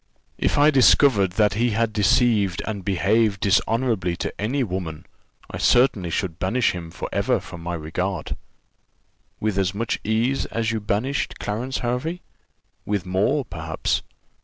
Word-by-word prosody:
"If -, -, +1 dB
I 145 Hz, +2 st, +6 dB
discovered 125 Hz, -7 st, +5 dB
that 105 Hz, 0 st, +3 dB
he 120 Hz, +4 st, +1 dB
had 115 Hz, -1 st, +1 dB
deceived 105 Hz, -2 st, +2 dB
and 105 Hz, -3 st, -4 dB
behaved 100 Hz, +2 st, +1 dB
dishonourably 105 Hz, -3 st, +1 dB
to 95 Hz, -, -5 dB
any 130 Hz, +6 st, 0 dB
woman, 90 Hz, -7 st, -5 dB, 0.5 s
I -, -, -5 dB
certainly 120 Hz, -8 st, +3 dB
should 85 Hz, 0 st, -3 dB
banish 115 Hz, +7 st, +1 dB
him 85 Hz, -2 st, -7 dB
for -, -, -6 dB
ever -, -, +1 dB
from 85 Hz, -2 st, -10 dB
my 85 Hz, +1 st, -3 dB
regard." 90 Hz, +4 st, -3 dB, 1.0 s
"With 105 Hz, -2 st, 0 dB
as 95 Hz, 0 st, 0 dB
much 115 Hz, +2 st, -2 dB
ease 115 Hz, +5 st, 0 dB
as 115 Hz, -1 st, -1 dB
you 115 Hz, -, -1 dB
banished 120 Hz, +7 st, -2 dB
Clarence 120 Hz, +6 st, -3 dB
Hervey?" 140 Hz, +9 st, -2 dB, 0.6 s
"With 100 Hz, -3 st, -2 dB
more, 105 Hz, +10 st, +1 dB
perhaps." 80 Hz, -4 st, -2 dB
105 Hz, 145 wpm, -23 LUFS, 95-120 Hz, 1.0 s, I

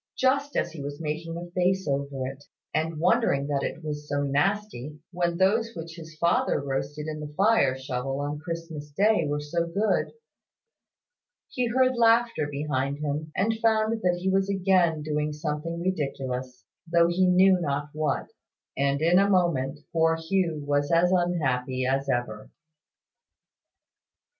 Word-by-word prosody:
Just 275 Hz, +2 st, +1 dB
as 170 Hz, -, 0 dB
he 160 Hz, -3 st, -8 dB
was 145 Hz, +1 st, -6 dB
making 165 Hz, +1 st, -4 dB
a 175 Hz, 0 st, -8 dB
face 185 Hz, +1 st, +1 dB
over 140 Hz, -1 st, -2 dB
it, 135 Hz, +2 st, -7 dB, 0.3 s
and 160 Hz, 0 st, -1 dB
wondering 150 Hz, -4 st, +2 dB
that 140 Hz, -1 st, -1 dB
it 160 Hz, -, -4 dB
was 150 Hz, -1 st, -5 dB
so 145 Hz, 0 st, 0 dB
nasty, 150 Hz, -, -1 dB
when 175 Hz, -1 st, -1 dB
those 225 Hz, +5 st, +2 dB
which 165 Hz, -1 st, -7 dB
his 160 Hz, -2 st, -11 dB
father 170 Hz, +2 st, +2 dB
roasted 140 Hz, +2 st, -3 dB
in 155 Hz, -1 st, -5 dB
the 150 Hz, -1 st, -7 dB
fire 195 Hz, -11 st, +3 dB
shovel 130 Hz, 0 st, -3 dB
on 145 Hz, +1 st, -3 dB
Christmas 165 Hz, -2 st, -6 dB
day 195 Hz, +1 st, +2 dB
were 145 Hz, 0 st, -1 dB
so 170 Hz, +3 st, -2 dB
good, 200 Hz, +6 st, 0 dB, 1.4 s
he 250 Hz, -1 st, -1 dB
heard 255 Hz, +2 st, +2 dB
laughter 230 Hz, -8 st, +3 dB
behind 140 Hz, -1 st, -2 dB
him, 150 Hz, +1 st, -3 dB
and 220 Hz, +4 st, +1 dB
found 220 Hz, 0 st, +2 dB
that 180 Hz, -2 st, +1 dB
he 185 Hz, -, -3 dB
was 195 Hz, +1 st, +2 dB
again 180 Hz, -5 st, +2 dB
doing 150 Hz, 0 st, -1 dB
something 150 Hz, +2 st, -3 dB
ridiculous, 135 Hz, -7 st, -3 dB, 0.3 s
though 170 Hz, 0 st, +5 dB
he 180 Hz, +2 st, +2 dB
knew 185 Hz, 0 st, +5 dB
not 145 Hz, -1 st, -2 dB
what: 150 Hz, -3 st, -2 dB, 0.4 s
and 140 Hz, +2 st, 0 dB
in 175 Hz, +3 st, +5 dB
a 200 Hz, +1 st, +3 dB
moment 150 Hz, -7 st, +1 dB
poor 165 Hz, 0 st, +3 dB
Hugh 165 Hz, -2 st, -1 dB
was 145 Hz, +1 st, 0 dB
as 170 Hz, +2 st, +4 dB
unhappy 135 Hz, -8 st, 0 dB
as 135 Hz, +1 st, 0 dB
ever. 110 Hz, -3 st, -2 dB
160 Hz, 155 wpm, -26 LUFS, 145-185 Hz, 1.4 s, though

